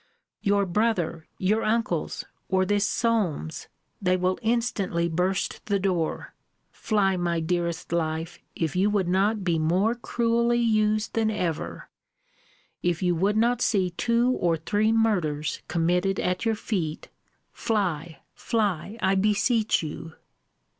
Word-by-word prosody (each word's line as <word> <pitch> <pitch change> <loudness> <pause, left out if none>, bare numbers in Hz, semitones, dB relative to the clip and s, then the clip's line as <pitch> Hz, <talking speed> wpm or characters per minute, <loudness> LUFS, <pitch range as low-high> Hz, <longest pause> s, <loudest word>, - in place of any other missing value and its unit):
Your 200 0 +2
brother! 180 -5 0
your 210 +4 +1
uncles! 215 -8 -1 0.2
or 190 0 +2
this 205 +1 +1
Solmes! 205 - -1 0.3
they 185 -1 +2
will 185 +1 0
instantly 220 -7 0
burst 180 +4 -1
the 200 -2 +2
door 185 -4 -1 0.4
fly, 195 -3 +1
my 170 -1 0
dearest 170 0 -2
life, 165 0 -2 0.2
if 160 -1 -2
you 190 +3 +3
would 200 -4 +1
not 200 +3 +1
be 170 -3 +1
more 185 +8 +2
cruelly 235 0 +1
used 215 -2 +1
than 225 -1 +1
ever 175 -7 -3 0.9
if 175 0 0
you 180 -1 +3
would 195 +5 +1
not 240 +2 +2
see 190 -4 +2
two 235 +6 +1
or 170 -9 +1
three 210 +7 +1
murders 180 -10 0
committed 180 +3 +1
at 180 +4 -1
your 225 -1 +2
feet, 175 -8 -3 0.4
fly, 170 -8 -2
fly, 210 -2 -1
I 190 - +3
beseech 210 +2 +2
you. 160 +1 -7
190 Hz, 130 wpm, -26 LUFS, 170-220 Hz, 0.9 s, you